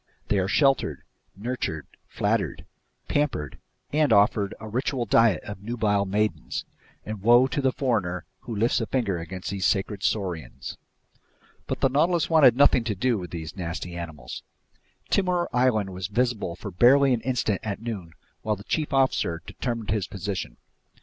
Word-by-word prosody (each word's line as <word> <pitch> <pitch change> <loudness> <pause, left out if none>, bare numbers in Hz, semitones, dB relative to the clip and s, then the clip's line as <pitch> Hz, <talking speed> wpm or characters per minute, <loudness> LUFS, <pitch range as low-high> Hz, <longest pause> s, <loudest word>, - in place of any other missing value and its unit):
They 100 - +3
are 95 - 0
sheltered, 135 +6 +2 0.3
nurtured, 105 - -3 0.2
flattered, - - -1 0.4
pampered, 135 - -1 0.3
and 150 -2 +3
offered 100 -1 +3
a 110 - -8
ritual 125 +2 -1
diet 110 -4 +4
of 105 -2 -8
nubile 105 -2 0
maidens; 105 +2 -1 0.4
and 110 -2 -5
woe 120 +4 +6
to 130 +2 -1
the 135 -1 +2
foreigner 105 -10 -1
who 115 - -6
lifts 115 +4 +2
a 115 - -2
finger 105 -9 0
against 90 +3 -6
these 95 -2 0
sacred 100 0 0
saurians. 95 -6 -3 0.9
But - - -3
the - - +5
Nautilus 165 +5 +2
wanted 140 -7 +7
nothing 140 -4 +5
to 110 -3 -1
do 120 +2 +1
with 90 -2 -7
these 80 -1 -6
nasty 85 -1 -5
animals. 80 -5 -7 0.7
Timor 180 -3 +2
Island 115 -6 +2
was 90 -1 -4
visible 110 -5 -1
for 100 - -7
barely 130 +8 +5
an 120 - 0
instant 115 -6 0
at 100 -3 -3
noon 105 -8 -6 0.3
while 105 -1 0
the 100 - -12
chief 150 +4 -2
officer 130 -11 +1
determined 115 -5 -4
his 105 -4 0
position. 100 0 -5
110 Hz, 155 wpm, -26 LUFS, 95-125 Hz, 0.9 s, wanted